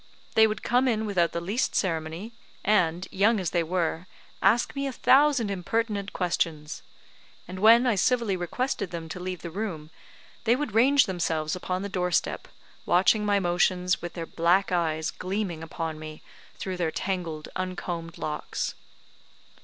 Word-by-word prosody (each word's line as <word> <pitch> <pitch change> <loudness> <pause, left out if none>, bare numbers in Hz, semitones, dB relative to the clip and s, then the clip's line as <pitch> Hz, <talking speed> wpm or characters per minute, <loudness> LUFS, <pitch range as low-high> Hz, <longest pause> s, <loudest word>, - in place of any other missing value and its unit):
They 220 0 +6
would 215 -1 -4
come 250 +2 +2
in 220 -3 +1
without 180 -5 +1
the 170 - -2
least 200 +9 -1
ceremony, 165 +3 -2 0.3
and, 180 -3 +2
young 210 +3 +3
as 180 -4 -2
they 175 - +2
were, 170 0 -1 0.3
ask 235 +6 +3
me 275 0 -1
a - - -2
thousand 265 -3 +4
impertinent 200 +1 -2
questions; 165 -4 -2 0.7
and 185 +1 -7
when 230 +4 +7
I 245 - +3
civilly 220 0 +1
requested 200 +4 -2
them 170 -2 -6
to 180 - -6
leave 180 -1 -5
the 170 - -5
room, 165 -6 -5 0.5
they 235 +1 +4
would 280 -5 -3
range 260 +4 +5
themselves 165 -5 -1
upon 185 +1 -3
the - - -2
door 180 -2 -1
step, 170 - -1 0.4
watching 190 +4 +3
my 205 -1 +2
motions, 180 0 +1
with 175 - -6
their 165 -2 -5
black 175 +4 +2
eyes 160 -3 0
gleaming 185 -3 -3
upon 160 -1 -5
me 155 0 -9 0.3
through 185 -1 -4
their 170 -2 0
tangled, 165 -4 -3
uncombed 175 -2 -4
locks. 150 -1 -3
185 Hz, 160 wpm, -27 LUFS, 170-215 Hz, 0.7 s, when